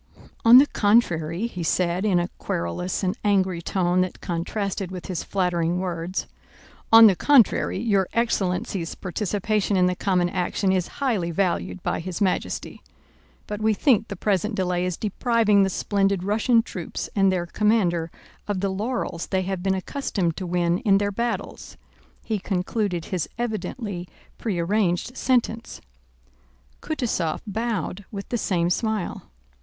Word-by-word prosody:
"On 230 +2 +9
the 275 - +8
contrary," 200 - +1
he 180 -7 -5
said, 175 +3 0
in 195 -4 +3
a 175 0 +1
querulous 85 - -3
and 185 0 0
angry 190 -4 +1
tone 180 0 +1
that 185 - -3
contrasted 190 +2 -3
with 185 -1 -7
his 180 -4 -3
flattering 175 -3 0
words, 180 0 -3 0.7
"on 225 0 +10
the 200 -4 +6
contrary, 250 - +3
your 200 -3 +1
excellency's 190 -6 -1
participation 205 +1 -1
in 180 - +4
the 180 0 +1
common 180 -2 +1
action 185 +1 0
is 185 -2 +1 0.2
highly 210 -11 +1
valued 180 +1 -1
by - - -1
His 180 +2 -5
Majesty; 195 -3 -2 0.6
but 210 0 -5
we 215 0 +2
think 230 -1 +3
the 200 - -5
present 205 +3 0
delay 180 -1 0
is 180 - -3
depriving 215 -1 +2
the 195 - +3
splendid 195 -1 0
Russian 225 +3 +3
troops 180 -7 -5
and 195 -2 +4
their 180 -2 -1
commander 175 -4 +1 0.4
of 205 -2 -1
the 195 +1 0
laurels 195 -3 -3
they 190 -1 0
have 190 -1 -3
been 190 +1 +1
accustomed 190 - -2
to 185 - -4
win 175 0 +1
in 195 -2 +3
their 205 0 0
battles," 235 +3 -4 0.5
he 220 -2 -2
concluded 185 -2 -2
his 185 -3 -3
evidently 215 -5 -4 0.3
prearranged 195 +2 0
sentence. 235 -3 0 1.0
Kutúzov 220 - -2
bowed 215 -2 -3
with 200 -1 -7
the 240 - -1
same 175 -3 0
smile. 220 -1 -2
190 Hz, 145 wpm, -24 LUFS, 180-215 Hz, 1.0 s, on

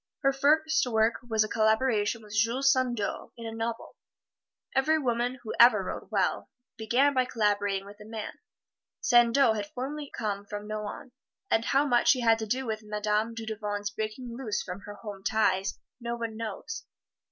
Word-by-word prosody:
Her 275 0 +4
first 310 +1 +3
work 220 -1 +2
was 220 -1 +3
a - - -3
collaboration 220 0 +1
with 210 -1 -12
Jules 235 +5 +3
Sandeau 245 -5 -2
in 230 - -8
a 225 - -4
novel. 225 +1 -4 0.8
Every 305 +4 +3
woman 245 -2 0
who 220 - -4
ever 235 -4 +7
wrote - - -5
well - - 0 0.3
began 250 +6 +2
by 255 -1 +2
collaborating 205 -4 0
with 205 +1 -13
a - - -10
man. 220 0 -7 0.6
Sandeau 240 0 +5
had 205 -2 -3
formerly 285 +3 -4
come 205 -3 -3
from 205 0 -7
Nohant, 215 +5 -6 0.4
and 225 - +3
how 275 +2 +3
much 245 -3 +4
he 255 - -3
had 225 -1 +4
to 220 - -4
do 260 +5 -1
with 220 -2 -3
Madame 210 +1 -1
Dudevant's 210 -2 -4
breaking 220 +3 -5
loose 235 -5 -2
from 180 +1 -6
her 205 - -7
homes 205 -2 -5
ties 195 -3 +1 0.2
no 235 -1 -3
one 230 -2 -4
knows. 230 - -5
225 Hz, 170 wpm, -28 LUFS, 210-250 Hz, 0.8 s, ever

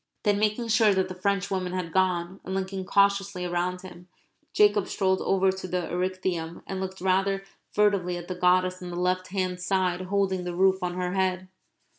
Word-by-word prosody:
Then, 205 -1 +2
making 215 +2 0
sure 220 -2 +4
that 190 0 +1
the - - -5
Frenchwomen 190 -1 -1
had 180 -3 -3
gone, 185 0 +1
and 190 - -4
looking 190 0 -3
cautiously 200 -2 +2
round 180 +1 -1
him, 180 -1 -12 0.4
Jacob 205 -2 +4
strolled 190 -1 +1
over 190 0 +2
to 190 0 -6
the 180 -1 -2
Erechtheum 180 -2 -2
and 190 - -4
looked 190 0 -5
rather 195 +1 +1 0.3
furtively 200 -4 +2
at 175 0 -8
the 185 - -3
goddess 185 0 +2
on 180 - -6
the 175 - -6
left 185 +1 0
hand 185 -1 -2
side 185 -1 0
holding 190 -1 0
the 175 -1 -4
roof 190 +1 +3
on 180 -1 -2
her 180 0 -2
head. 185 -1 0
185 Hz, 185 wpm, -26 LUFS, 180-195 Hz, 0.4 s, sure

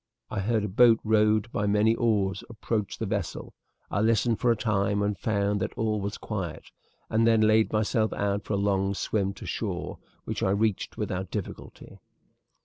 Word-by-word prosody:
"I - - -2
heard 110 +2 0
a - - -1
boat 115 +3 +5
rowed 110 +1 +2
by 105 - -1
many 105 +2 +3
oars 105 -4 0
approach 110 -2 -3
the - - -3
vessel. - - -4 0.4
I 100 - 0
listened 115 +1 +2
for 125 - +2
a 115 - +4
time 100 -2 0
and 105 0 0
found 100 0 0
that - - -3
all 110 -2 0
was 100 +1 -4
quiet, 90 -7 -5 0.4
and 115 +1 +2
then 115 -1 +4
laid 110 0 +4
myself 110 +1 +1
out 100 0 -1
for 105 - -1
the 100 - 0
long 100 0 +1
swim 100 -1 -1
to - - -10
shore, - - -4 0.2
which - - -4
I - - +2
reached 105 0 0
without 95 +1 -3
difficulty. 105 -4 -7
105 Hz, 180 wpm, -27 LUFS, 100-110 Hz, 0.4 s, boat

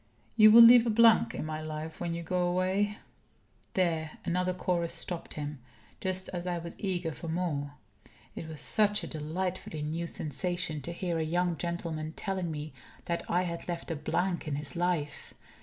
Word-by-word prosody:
"You 215 -1 +8
will 230 +2 +10
leave 240 0 +9
a - - +3
blank 230 0 +5
in - - -3
my 155 0 -4
life 155 +1 -6
when 170 -1 -2
you 170 - -5
go 180 +1 0
away 190 +4 +1 0.4
" - - -30
There 165 -4 0
another 180 +1 +1
chorus 180 -2 -1
stopped 175 -2 -5
him, 150 -1 -5 0.4
just 185 0 -2
as 175 0 -5
I 175 -1 -1
was 170 0 -6
eager 180 -4 -1
for 165 - -8
more. 155 -4 -2 0.6
It 160 - -6
was 155 -4 -7
such 210 -1 +3
a - - -4
delightfully 160 0 -4
new 165 +3 -3
sensation 155 +1 -2
to 170 - -5
hear 170 -1 -2
a - - +1
young 175 +2 0
gentleman 165 -2 -4
telling 190 -2 -2
me 150 -1 -5 0.3
that 170 0 -3
I 180 +1 +2
had 170 -2 -5
left 170 -1 -4
a - - -1
blank 175 +4 -1
in 145 - -1
his 145 +2 -4
life. 170 -4 -2
170 Hz, 185 wpm, -30 LUFS, 155-185 Hz, 0.6 s, will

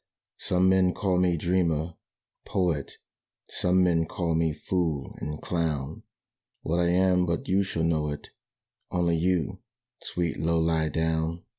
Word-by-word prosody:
"Some 90 +1 +2
men 95 -1 +3
call 95 -3 +1
me 90 -2 +2
dreamer, 85 -1 0 0.5
poet: 85 -7 -1 0.6
Some 90 +1 +2
men 85 -2 +2
call 85 -1 -1
me 80 0 +2
fool 80 -2 -2
and 75 0 -5
clown 80 -4 -2 0.6
What 85 +2 0
I 85 0 +2
am 90 0 +3
but 85 0 -2
you 95 +2 +3
shall 90 -4 -2
know 80 -2 +1
it, 75 - -7 0.6
Only 85 -1 +1
you, 85 -2 0 0.4
sweet 85 -2 -2
Low 85 +1 +1
lie 80 -1 +1
down." 80 +1 -1
85 Hz, 140 wpm, -27 LUFS, 80-90 Hz, 0.6 s, men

